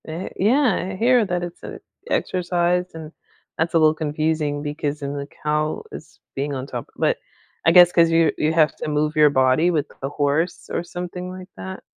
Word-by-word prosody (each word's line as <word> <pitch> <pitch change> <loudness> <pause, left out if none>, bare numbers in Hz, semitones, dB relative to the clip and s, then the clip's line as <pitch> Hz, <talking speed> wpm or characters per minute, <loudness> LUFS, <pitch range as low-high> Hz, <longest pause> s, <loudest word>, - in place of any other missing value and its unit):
Eh, 165 +4 -5
yeah, 245 +4 +3 0.2
I - - -6
hear 240 +3 +3
that 180 -2 -2
it's 175 0 -7
a - - -8 0.3
exercise 180 0 0
and 160 -1 -8 0.5
that's 160 +1 -1
a - - +7
little 155 -1 +5
confusing 155 -1 -1
because 150 0 -3
then 140 0 -4
the 140 -1 -5 0.2
cow 150 0 -1
is - - -11 0.2
being 140 +1 -2
on 130 0 -4
top, 125 -3 -7
but - - +1 0.5
I 165 - +6
guess 175 0 +8
'cause 165 -1 +4
you 165 -1 +3
you 155 - +1
have 155 -2 +3
to - - -5
move 150 +1 0
your 150 -1 +6
body 130 +4 +3
with 155 -4 -1
a 135 - -2
horse 145 +4 -1
or - - -1
something 180 +1 -6
like 185 0 -9
that. 95 0 -7
160 Hz, 195 wpm, -22 LUFS, 145-175 Hz, 0.5 s, guess